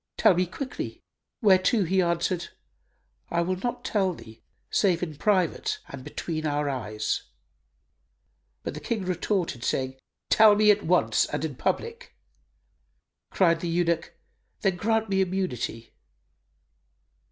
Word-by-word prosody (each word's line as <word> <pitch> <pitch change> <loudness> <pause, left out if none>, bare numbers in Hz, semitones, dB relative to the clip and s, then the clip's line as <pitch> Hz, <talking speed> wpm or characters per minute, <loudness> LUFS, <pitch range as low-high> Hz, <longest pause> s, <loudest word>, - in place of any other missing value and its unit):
Tell - - +6
me 180 +1 +1
quickly;" 260 - -6 0.4
whereto 195 +2 +4
he 185 +2 +2
answered, 170 0 0 0.8
"I 170 - +1
will 185 +2 -1
not 240 +6 -4
tell 190 -4 +1
thee, 110 -5 -14 0.3
save 180 -4 +2
in 160 -4 -4
private 205 - +1
and 130 - -8
between 155 +1 -4
our 145 0 0
eyes," 110 -4 -2 1.4
but - - -4
the 150 - -6
King 195 +6 -3
retorted, 180 - -1
saying, 130 0 -1 0.3
"Tell 215 -1 +7
me 210 0 +6
at 205 0 +2
once 180 +2 +3
and - - -2
in - - -4
public." 465 +1 -3 1.1
Cried 170 -3 +3
the 170 - -3
eunuch, 170 -1 0 0.4
"Then 195 -3 +2
grant 225 +3 +1
me 195 -1 +1
immunity." 125 - -3
180 Hz, 130 wpm, -26 LUFS, 160-200 Hz, 1.4 s, Tell